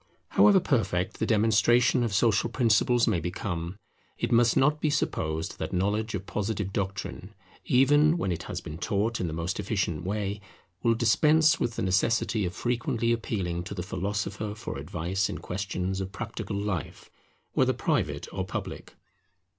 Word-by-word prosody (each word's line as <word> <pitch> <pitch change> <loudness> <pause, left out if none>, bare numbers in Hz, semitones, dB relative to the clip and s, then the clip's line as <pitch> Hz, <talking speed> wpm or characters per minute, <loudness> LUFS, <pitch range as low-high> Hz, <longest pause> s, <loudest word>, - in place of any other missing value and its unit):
However 200 -2 +6
perfect 95 - 0
the - - 0
demonstration 115 +3 +4
of 115 - -1
social 110 +2 +2
principles 120 0 +3
may 85 - +2
become, 85 +1 -4 0.4
it 120 - -2
must 120 0 +4
not 150 +3 +3
be 155 - +2
supposed 80 - -2
that - - -4
knowledge 105 +4 0
of 95 -1 -5
Positive 100 -2 -3
doctrine, 100 -1 -4 0.3
even 145 +5 +4
when 95 - -1
it 85 - -3
has - - -4
been 80 +2 -8
taught 110 +5 -1
in 90 - -1
the - - -3
most 85 +5 -3
efficient 95 -6 -1
way, 100 +1 -2 0.4
will 115 +3 +3
dispense 150 +8 +4
with 120 - -1
the - - -2
necessity 105 +2 +1
of 90 - -7
frequently 120 -1 0
appealing 95 -7 -2
to 100 - -6
the 90 - -3
philosopher 100 +3 -3
for 105 - -6
advice 95 +4 -2
in - - -4
questions 95 0 -3
of 95 0 -5
practical 105 0 -5
life, 100 -5 -4 0.4
whether - - +3
private - - -1
or - - -2
public. - - -6
105 Hz, 160 wpm, -27 LUFS, 95-115 Hz, 0.4 s, However